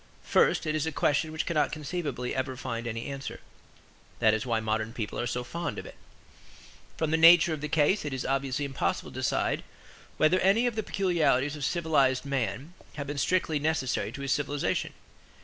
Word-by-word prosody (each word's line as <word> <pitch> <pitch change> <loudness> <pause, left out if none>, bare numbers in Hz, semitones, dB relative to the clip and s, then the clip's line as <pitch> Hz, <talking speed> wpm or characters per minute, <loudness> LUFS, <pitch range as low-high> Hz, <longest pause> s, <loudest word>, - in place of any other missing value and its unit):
First - - +3
it 155 - 0
is 155 0 -1
a - - -1
question 150 +2 +1
which 155 - -2
cannot 155 -3 +1
conceivably 145 -5 -3
ever 130 -1 -2
find 120 -2 -4
any 115 0 -4
answer: 135 -1 -6 0.8
that 110 -2 +4
is 110 +3 -2
why 115 -2 +1
modern 110 +1 -2
people 110 -4 -4
are 120 - -1
so 125 +1 -2
fond 170 +7 -4
of - - -6
it. - - -10 1.0
From 160 -1 -1
the 160 - +3
nature 165 0 +7
of 155 - -5
the 150 - -3
case 160 +6 +2
it 145 - -4
is 130 -1 -3
obviously 135 +1 -1
impossible 135 -1 -2
to - - -7
decide - - 0 0.5
whether 165 +4 +4
any 200 +6 +3
of 240 -3 0
the 220 - 0
peculiarities 160 -9 +1
of 150 - -6
civilized 140 -6 +2
man 135 - -2 0.2
have 140 - -4
been 145 0 -4
strictly 165 -2 +1
necessary 150 -4 -1
to 140 - -7
his 140 -1 -2
civilization. 145 0 -1
145 Hz, 190 wpm, -28 LUFS, 130-160 Hz, 1.0 s, nature